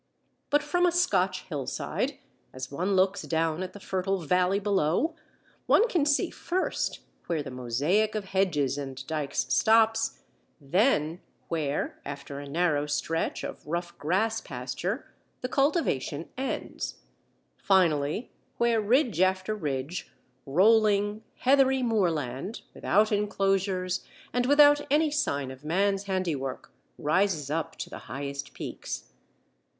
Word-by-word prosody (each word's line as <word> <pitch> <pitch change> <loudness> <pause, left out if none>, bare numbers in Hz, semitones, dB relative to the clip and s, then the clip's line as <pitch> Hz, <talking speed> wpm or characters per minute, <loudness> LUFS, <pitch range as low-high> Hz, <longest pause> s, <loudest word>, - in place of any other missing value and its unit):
But 290 +1 +3
from 355 0 +2
a - - +3
Scotch 190 - +1
hillside, 145 -7 -3 0.4
as 130 +1 -6
one 180 +7 0
looks 190 +1 +3
down 160 +1 0
at 185 0 -5
the 205 - -10
fertile 195 0 -1
valley 180 +4 +2
below, 200 - +1 0.5
one 460 - +5
can 335 -9 +1
see 295 +5 +2
first 365 +2 -2 0.3
where 165 -4 -1
the 135 - -7
mosaic 145 - +1
of 210 -2 -2
hedges 170 -8 +1
and 135 -1 -6
dykes 150 -2 -1
stops, 225 0 +3 0.4
then 165 - +1 0.3
where, 150 -4 -2
after 140 0 -7
a 140 0 -8
narrow 150 -2 +1
stretch 150 +3 -1
of - - -6
rough 175 +2 -3
grass 220 +8 +1
pasture, 130 - -4 0.4
the 250 - -1
cultivation 265 - 0
ends; 265 +1 -4 0.6
finally, 170 - +2 0.3
where, 235 -2 +3
ridge 230 - +2
after 185 +2 +2
ridge, 150 -3 -3 0.4
rolling, 205 +5 +3 0.2
heathery 265 0 +4
moorland, 175 - -1
without 215 +2 +2
enclosures 195 -3 0 0.3
and 245 +1 +1
without 290 +1 +7
any 300 +2 +3
sign 140 - -1
of 130 +2 -12
man's 195 +5 +1
handiwork, 170 -9 -2 0.3
rises 155 -3 +1
up 160 0 -2
to - - -5
the - - -8
highest 140 +2 -5
peaks. - - -6
185 Hz, 125 wpm, -28 LUFS, 150-220 Hz, 0.6 s, without